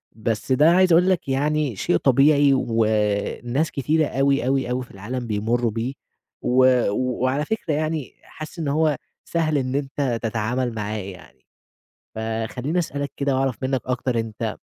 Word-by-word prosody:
بس 110 +2 -3
ده 150 +5 +5
عايز 185 0 +4
أقول 180 +3 +5
لك 180 -6 0
يعني 145 -1 0
شيء 90 - +1
طبيعي 140 - +4
وناس 115 +4 0
كتيرة 155 +3 +1
أوي، 135 -1 +1
أوي، 135 -2 +1
أوي 125 +1 -1
في 125 - -16
العالم 120 +5 -5
بيمروا 115 +2 0
بيه، 115 +4 -3 0.5
و 130 +1 +4 0.3
وعلى 130 +4 0
فكرة 220 -8 -2
يعني 155 -2 -2
حاسس 155 +3 -10
إن 155 - -2
هو 150 +1 +2 0.3
سهل 160 -3 0
إن 130 -1 -1
أنت 135 -3 -1
تتعامل 115 +2 -1
معاه 105 0 -3
يعني، 95 -3 -10 0.7
فخليني 115 +8 -2
أسألك 145 -5 -3
كده 140 -1 0
وأعرف 135 -3 0
منك 130 -1 0
أكتر 125 -1 -1
أنت 110 -2 -4
130 Hz, 150 wpm, -23 LUFS, 115-145 Hz, 0.7 s, ده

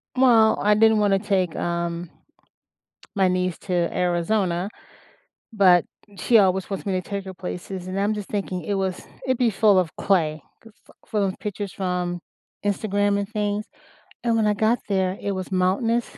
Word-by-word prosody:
Well, 235 -4 +5
I 210 0 +4
didn't 220 +1 +5
wanna 200 -2 +3
take, 190 -4 0
um, 170 0 -3 1.1
my 190 -2 +3
niece 180 -1 0
to 185 - -5 0.2
Arizona, 180 +1 0 0.8
but 185 -5 +5 0.3
she 230 +4 +4
always 190 -1 +2
wants 195 - -4
me 195 - -1
to 185 - 0
take 200 +1 -5
her 190 - -7
places, 180 0 -6
and 185 +1 -3
I'm 205 +2 +1
just 210 -2 -6
thinking, 190 -4 -3
it 200 - -2
was 190 -2 -2 0.2
it'd 260 -2 +1
be 245 -2 +3
full 205 -1 +4
of 180 -3 0
clay, 160 -6 +1 0.2
g 225 - -14
f 225 - -24
for 215 - -1
those 195 -1 0
pictures 205 -1 -5
from 180 -2 -2 0.5
Instagram, 205 0 +1
and 200 0 -4
things, 210 -1 -2 0.6
and 235 -1 +2
when 220 -2 +2
I 210 - +3
got 220 +3 +2
there, 190 -1 0
it 200 - -2
was 185 0 -5
mountainous, 205 +6 0
195 Hz, 175 wpm, -23 LUFS, 185-210 Hz, 1.1 s, Well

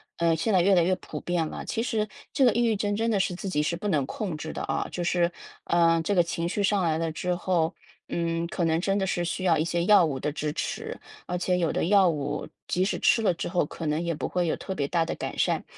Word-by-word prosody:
呃， 170 -1 +2
现 165 +7 0
在 185 - +5
越 195 +2 +4
来 175 - +5
越 185 +1 +2
普 - - -8
遍 175 -2 -1
了。 - - -6
其 225 - -2
实 215 -3 0 0.2
这 270 - +3
个 240 - +5
抑 240 - +2
郁 225 -3 +2
症 205 0 -1
真 225 +1 0
的 200 - +2
是 180 -1 0
自 190 +1 -5
己 150 -4 +1
是 160 +3 0
不 205 +4 -3
能 145 -7 +1
控 180 0 -4
制 160 +1 -6
的 - - -5
啊， - - -1
就 175 - -4
是， 175 0 +2 0.4
呃， 165 -1 +3
这 205 - +1
个 175 - +5
情 170 0 -2
绪 200 +3 -1
上 200 -1 +2
来 160 -1 +1
了 165 -1 -1
之 180 +3 -2
后， 175 -3 0 0.4
嗯， 170 0 -1
可 175 0 -1
能 160 0 +2
真 195 +1 +1
的 190 - +1
是 175 - 0
需 180 +2 -3
要 170 -4 +4
一 155 - +1
些 170 0 0
药 205 -3 +7
物 135 -4 -2
的 150 - -2
支 150 0 -3
持， - - -4 0.3
而 180 - -2
且 180 0 +1
有 165 -3 +1
的 - - 0
药 195 -1 +5
物 145 -1 -3 0.2
即 185 - +1
使 - - -1
吃 225 - +4
了 190 -5 +3
之 - - -4
后， 175 -3 +1
可 160 +2 -7
能 150 +2 0
也 170 -1 -1
不 155 - -3
会 180 -1 0
有 - - +1
特 190 - -5
别 140 -5 -1
大 170 -2 +2
的 - - -3
改 - - -5
善。 - - +1
175 Hz, 300 characters per minute, -27 LUFS, 165-195 Hz, 0.4 s, 药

